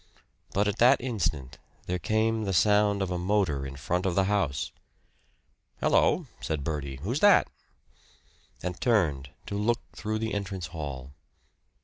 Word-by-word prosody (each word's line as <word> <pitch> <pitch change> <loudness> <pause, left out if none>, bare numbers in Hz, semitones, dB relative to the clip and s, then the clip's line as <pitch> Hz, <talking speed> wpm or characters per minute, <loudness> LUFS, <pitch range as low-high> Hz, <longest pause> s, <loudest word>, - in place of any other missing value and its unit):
But 100 +1 +1
at 105 +1 -1
that 120 +2 +6
instant 80 - -3 0.3
there 90 0 -2
came 110 +4 +1
the 95 - -1
sound 105 +1 +3
of 95 - -3
a 90 - -1
motor 90 -8 0
in 65 - -8
front 90 +7 -1
of 90 - -1
the 95 - +4
house. 95 -9 0 1.1
"Hello," - - +3
said 75 -3 -3
Bertie. 70 -3 -3
"Who's 120 - -1
that?" 205 +2 +6 1.2
and 90 0 -4
turned 80 - +1 0.2
to - - -6
look 115 +3 +1
through 110 0 -2
the 110 0 -3
entrance 95 -3 -3
hall. 70 -5 -6
95 Hz, 145 wpm, -28 LUFS, 75-105 Hz, 1.2 s, that